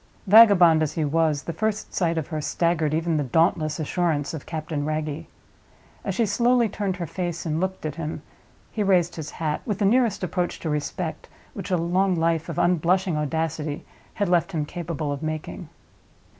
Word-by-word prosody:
Vagabond 195 Hz, -6 st, +7 dB
as 155 Hz, -1 st, 0 dB
he 155 Hz, -1 st, -1 dB
was, 155 Hz, -1 st, +1 dB
the 170 Hz, -, -4 dB
first 215 Hz, +5 st, -2 dB
sight 170 Hz, -3 st, 0 dB
of 160 Hz, -, -3 dB
her 155 Hz, -2 st, -3 dB
staggered 165 Hz, -1 st, 0 dB
even 160 Hz, +1 st, 0 dB
the 150 Hz, -, 0 dB
dauntless 155 Hz, +2 st, +1 dB
assurance 155 Hz, -2 st, -1 dB
of 155 Hz, -, -7 dB
Captain 155 Hz, -2 st, -3 dB
Wragge. 155 Hz, 0 st, -3 dB, 0.8 s
As -, -, -3 dB
she 230 Hz, -, +2 dB
slowly 235 Hz, +3 st, +3 dB
turned 200 Hz, -2 st, -2 dB
her 175 Hz, -, -3 dB
face 175 Hz, +1 st, -4 dB
and 155 Hz, -1 st, -1 dB
looked 190 Hz, -2 st, -3 dB
at 155 Hz, 0 st, -4 dB
him, 160 Hz, -1 st, -5 dB, 0.5 s
he 215 Hz, -, -3 dB
raised 180 Hz, -4 st, +2 dB
his 155 Hz, -2 st, -6 dB
hat, 155 Hz, -2 st, -3 dB
with 210 Hz, -4 st, -2 dB
the 205 Hz, -, +1 dB
nearest 225 Hz, -2 st, +2 dB
approach 180 Hz, 0 st, -2 dB
to 160 Hz, -, -2 dB
respect 150 Hz, -1 st, -4 dB, 0.2 s
which -, -, -6 dB
a 180 Hz, -, +2 dB
long 180 Hz, +3 st, +1 dB
life 165 Hz, 0 st, 0 dB
of 165 Hz, -, -5 dB
unblushing 180 Hz, +1 st, +2 dB
audacity 150 Hz, 0 st, -2 dB, 0.3 s
had 205 Hz, -, 0 dB
left 175 Hz, +2 st, +1 dB
him 155 Hz, -3 st, -1 dB
capable 160 Hz, -3 st, -4 dB
of 140 Hz, -, -4 dB
making. 155 Hz, -1 st, -5 dB
165 Hz, 185 wpm, -24 LUFS, 155-185 Hz, 0.8 s, Vagabond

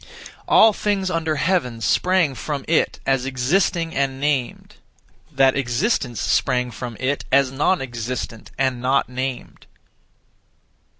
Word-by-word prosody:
All 220 Hz, -1 st, +6 dB
things 195 Hz, -3 st, -1 dB
under 160 Hz, -2 st, -1 dB
heaven 140 Hz, -6 st, 0 dB
sprang 175 Hz, -, +2 dB
from 140 Hz, +1 st, -5 dB
It 160 Hz, -, +1 dB
as 135 Hz, -1 st, +1 dB
existing 165 Hz, +6 st, 0 dB
(and 135 Hz, -1 st, -1 dB
named); 140 Hz, -4 st, -2 dB, 0.5 s
that 135 Hz, -1 st, +3 dB
existence 125 Hz, -, -1 dB
sprang 125 Hz, -1 st, 0 dB
from 120 Hz, +1 st, -7 dB
It 135 Hz, +3 st, -1 dB
as 135 Hz, -1 st, +3 dB
non 145 Hz, +4 st, +1 dB
existent 120 Hz, -2 st, -5 dB
(and 130 Hz, -2 st, 0 dB
not 130 Hz, +1 st, +1 dB
named). 130 Hz, 0 st, -5 dB
135 Hz, 120 wpm, -21 LUFS, 125-160 Hz, 0.5 s, All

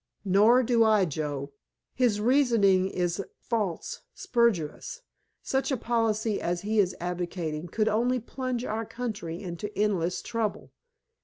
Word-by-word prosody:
"Nor 215 Hz, +7 st, +5 dB
do 235 Hz, -1 st, +3 dB
I, 215 Hz, -3 st, +4 dB
Joe. 145 Hz, -3 st, -4 dB, 0.4 s
His 240 Hz, -5 st, +2 dB
reasoning 215 Hz, -6 st, +3 dB
is 180 Hz, +1 st, -1 dB, 0.2 s
false, 210 Hz, -8 st, -3 dB
spurious. 235 Hz, -, 0 dB, 0.4 s
Such 265 Hz, +2 st, 0 dB
a 265 Hz, -, +1 dB
policy 225 Hz, -2 st, 0 dB
as 175 Hz, 0 st, -1 dB
he 215 Hz, +1 st, 0 dB
is 185 Hz, -2 st, +2 dB
advocating 175 Hz, -2 st, -3 dB
could 215 Hz, +5 st, 0 dB
only 240 Hz, +4 st, +2 dB
plunge 250 Hz, +1 st, -4 dB
our 220 Hz, +1 st, -2 dB
country 210 Hz, -8 st, -5 dB
into 180 Hz, +3 st, -5 dB
endless 190 Hz, -4 st, 0 dB
trouble. 225 Hz, -2 st, -3 dB
210 Hz, 130 wpm, -28 LUFS, 180-235 Hz, 0.4 s, Nor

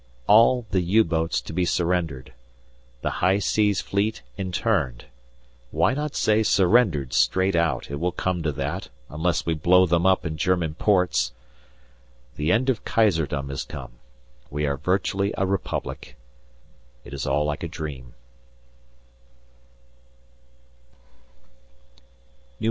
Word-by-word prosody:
All 115 Hz, +3 st, +5 dB
the 95 Hz, -, +2 dB
U 100 Hz, +6 st, +4 dB
boats 80 Hz, -4 st, -1 dB
to -, -, -9 dB
be 90 Hz, +2 st, 0 dB
surrendered, 85 Hz, -7 st, -1 dB, 0.7 s
the -, -, 0 dB
High 95 Hz, +2 st, +4 dB
Seas 105 Hz, -1 st, +1 dB
Fleet 100 Hz, -7 st, -2 dB
interned; 65 Hz, -9 st, -1 dB, 0.6 s
why 125 Hz, -, +2 dB
not 150 Hz, +1 st, -3 dB
say 110 Hz, 0 st, +2 dB
"surrendered" 95 Hz, -, +3 dB
straight 95 Hz, 0 st, +2 dB
out, 80 Hz, -6 st, 0 dB
it 70 Hz, -, -4 dB
will 90 Hz, +2 st, 0 dB
come 90 Hz, 0 st, -2 dB
to 80 Hz, -2 st, -1 dB
that, 75 Hz, +7 st, -4 dB, 0.2 s
unless 80 Hz, +3 st, -1 dB
we 85 Hz, -, +1 dB
blow 90 Hz, +4 st, +4 dB
them 85 Hz, +1 st, +2 dB
up 95 Hz, -1 st, +2 dB
in 80 Hz, -1 st, -3 dB
German 85 Hz, -2 st, 0 dB
ports. 90 Hz, -, +1 dB, 1.0 s
The 75 Hz, +3 st, 0 dB
end 120 Hz, +6 st, +2 dB
of 130 Hz, -5 st, 0 dB
Kaiserdom 80 Hz, -10 st, +1 dB
has 70 Hz, -, -4 dB
come; -, -, -9 dB, 0.6 s
we 75 Hz, +1 st, -2 dB
are 70 Hz, -1 st, 0 dB
virtually 100 Hz, +5 st, 0 dB
a 95 Hz, -, +1 dB
republic; 90 Hz, -8 st, -4 dB, 0.9 s
it 60 Hz, -, -10 dB
is 70 Hz, -2 st, -4 dB
all 75 Hz, -, +1 dB
like 75 Hz, 0 st, -3 dB
a 85 Hz, -, -3 dB
dream. 75 Hz, -8 st, -7 dB
90 Hz, 125 wpm, -24 LUFS, 75-100 Hz, 1.0 s, All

